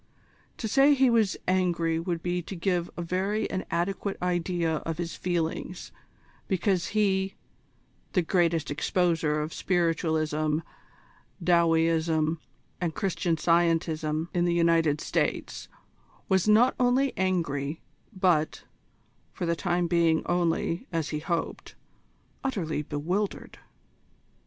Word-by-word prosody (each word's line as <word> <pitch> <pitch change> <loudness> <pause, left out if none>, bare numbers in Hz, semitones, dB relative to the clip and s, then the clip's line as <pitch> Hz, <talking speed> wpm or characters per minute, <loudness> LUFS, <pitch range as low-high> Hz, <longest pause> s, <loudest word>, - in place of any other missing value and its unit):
To 225 - -3
say 275 +6 +5
he 265 -2 +4
was 220 -5 +2
angry 175 -3 +1
would 170 -1 -3
be 180 0 -1
to 190 - -8
give 175 -1 -1
a 175 - -3
very 195 +5 -1
inadequate 195 +2 -2
idea 175 -2 0
of 165 +1 -4
his 170 -1 -4
feelings, 175 0 -3 0.6
because 185 -2 +1
he, 195 -2 +1 0.8
the 180 - +2
greatest 170 -3 +1
exposer 160 0 +1
of 155 - -6
Spiritualism, 160 -3 0 0.8
Dowieism, 165 -2 +2 0.4
and 165 -3 -1
Christian 185 -4 0
Scientism 160 -1 +1
in 175 -1 +2
the 175 -1 +1
United 165 -3 +3
States, - - -2 0.6
was 190 0 +2
not 225 +4 +5
only 255 +2 +2
angry, 165 -5 -1 0.3
but 180 -6 +1 0.7
for - - -4
the 170 0 +1
time 175 0 0
being 170 -2 +2
only, 175 +3 0
as 165 -3 -1
he 150 - -2
hoped 170 +1 -3 0.7
utterly 180 - -1
bewildered. 175 +8 -3
170 Hz, 115 wpm, -27 LUFS, 165-185 Hz, 0.8 s, say